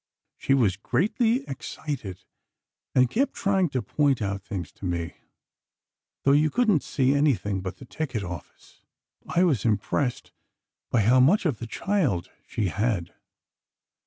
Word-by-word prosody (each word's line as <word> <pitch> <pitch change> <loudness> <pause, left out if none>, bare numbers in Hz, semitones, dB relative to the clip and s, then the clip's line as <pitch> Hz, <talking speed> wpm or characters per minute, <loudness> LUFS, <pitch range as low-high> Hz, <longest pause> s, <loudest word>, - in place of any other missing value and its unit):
She 135 - +1
was 105 -8 +2
greatly 225 - +1
excited, 130 - -6 0.7
and 125 0 +5
kept 265 - 0
trying 195 -3 +1
to 130 -4 -2
point 140 +4 +1
out 100 -2 -2
things 95 -5 -6
to - - -10
me, 85 -2 -2 1.1
though 140 - +4
you 150 +2 +4
couldn't 215 - +2
see 135 0 +1
anything 110 -10 +1
but 95 0 -5
the 130 - -11
ticket 125 -6 -3
office. 90 -2 -10 0.5
I 175 - +2
was 145 - +2
impressed 115 +4 -1 0.6
by 120 - +3
how 125 +5 +5
much 165 +11 +4
of 145 -10 0
the 115 - -6
child 135 - -1 0.2
she 105 -6 -1
had. 100 -4 -1
125 Hz, 140 wpm, -26 LUFS, 100-155 Hz, 1.1 s, and